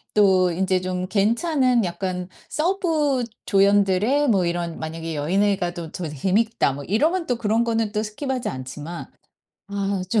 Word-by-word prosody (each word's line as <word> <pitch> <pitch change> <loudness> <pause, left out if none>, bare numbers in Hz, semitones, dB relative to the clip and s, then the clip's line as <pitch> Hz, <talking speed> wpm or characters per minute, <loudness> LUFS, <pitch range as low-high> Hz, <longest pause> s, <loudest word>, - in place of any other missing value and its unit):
또 190 -3 +5
인제 185 +2 +1
좀 185 0 -3
괜찮은 240 - +2
약간 180 +1 -3 0.2
서브 310 -6 +1 0.2
조연들의 200 +7 +3
뭐 195 -5 +3
이런 170 -1 -2
만약에 165 +1 -5
'여 145 +1 -3
얘네가 195 -2 +1
또 165 -3 -6
저 175 - -4
재밌다.' 190 - +1
뭐 140 +1 -7
이러면 320 - +1
또 245 - +1
그런 225 +1 +1
거는 225 -2 0
또 210 - -1
스킵하지 250 +4 -3
않지만, 145 +6 -6 0.6
아 200 -1 -1
좀 220 - +3
200 Hz, 290 characters per minute, -23 LUFS, 175-235 Hz, 0.6 s, 또